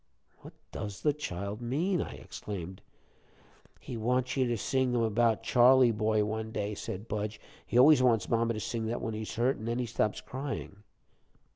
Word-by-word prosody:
'" - - -36
"What - - -12 0.2
does 105 -2 -6
the 150 - +3
child 100 -6 -5
mean?" 160 +10 0
I - - -5
exclaimed. 95 -2 -7 1.0
"He 120 - -7
wants 125 +3 0
you 130 -2 +2
to 120 -1 0
sing 130 +4 0
to - - +2
him 115 - +2
about 115 0 +2
'Charley 125 +1 +6
boy 110 -1 +1
one 110 +1 -3
day,'" 105 -1 -2
said 100 +1 -6
Budge. 105 0 -3 0.3
"He 120 - 0
always 140 +2 +7
wants 120 -4 +3
mama 115 0 +1
to - - -3
sing 110 +1 -3
that 115 +2 -2
when 115 - -3
he's 110 0 -5
hurt, 125 +4 +1
an' 110 - -7
then 115 +1 -1
he 125 - -1
stops 110 -2 -1
crying." 135 -6 -6
115 Hz, 190 wpm, -30 LUFS, 105-125 Hz, 1.0 s, always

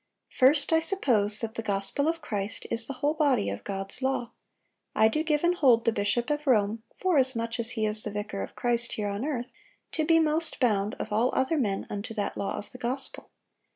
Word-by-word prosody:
"First, 280 +5 +5
I 320 - +6
suppose 235 - +2
that 225 -1 -3
the 230 - -4
gospel 205 +7 0
of 330 0 -1
Christ 205 -1 -4
is 230 0 -2
the 275 - -4
whole 295 - +3
body 285 -9 +2
of - - -6
God's 195 +4 -5
law.... 260 -2 -1 0.6
I 220 - +5
do 265 +8 0
give 305 -1 0
and 345 +1 +4
hold 255 -9 +4
the 230 - +4
bishop 225 +5 0
of 295 0 -2
Rome, 220 -2 +2
forasmuch 260 -10 0
as 230 0 0
he 220 - +1
is 215 0 -1
the 215 - -4
vicar 205 -1 -4
of - - -7
Christ 235 -1 0
here 210 -1 -2
on 200 +3 -3
earth, 255 -4 -3 0.4
to 315 - -1
be 325 +1 +4
most 320 +1 +1
bound, 210 -4 +1
of 220 - -6
all 230 +4 +3
other 280 +4 +1
men, 200 -6 -1
unto 205 +2 -5
that 205 -2 -2
law 200 - -3
of 205 - -8
the 250 - -11
gospel. 250 +3 -4
235 Hz, 215 wpm, -28 LUFS, 210-290 Hz, 0.6 s, I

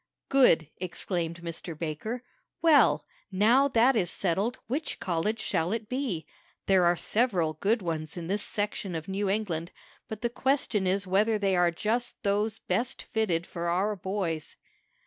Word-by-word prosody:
"Good!" 250 - +5
exclaimed 170 -2 -3
Mr. 165 -1 -6
Baker. 175 +10 -4 0.4
"Well, 275 - +5 0.3
now 230 +8 +4
that 255 0 +4
is 185 -6 +1
settled, 200 +7 0
which 285 +7 -3
college 180 +5 -1
shall 170 -4 0
it 225 -2 -3
be? 250 - -2 0.4
There 190 -2 +4
are 175 0 +4
several 185 -6 +1
good 215 +1 +2
ones 160 -1 -3
in 170 - -5
this 200 +4 -1
section 205 -3 -3
of 160 0 -5
New 195 +1 -1
England, 180 -5 -1 0.4
but 220 -1 -6
the 235 - +2
question 245 -7 0
is 195 +1 +1
whether 210 +4 +2
they 195 -2 +1
are 175 -1 +4
just 220 +9 -2
those 210 +1 +1
best 250 +3 -2
fitted 185 -7 0
for 170 -1 -4
our 195 +5 +1
boys." 185 -5 -3
195 Hz, 155 wpm, -28 LUFS, 170-225 Hz, 0.4 s, Good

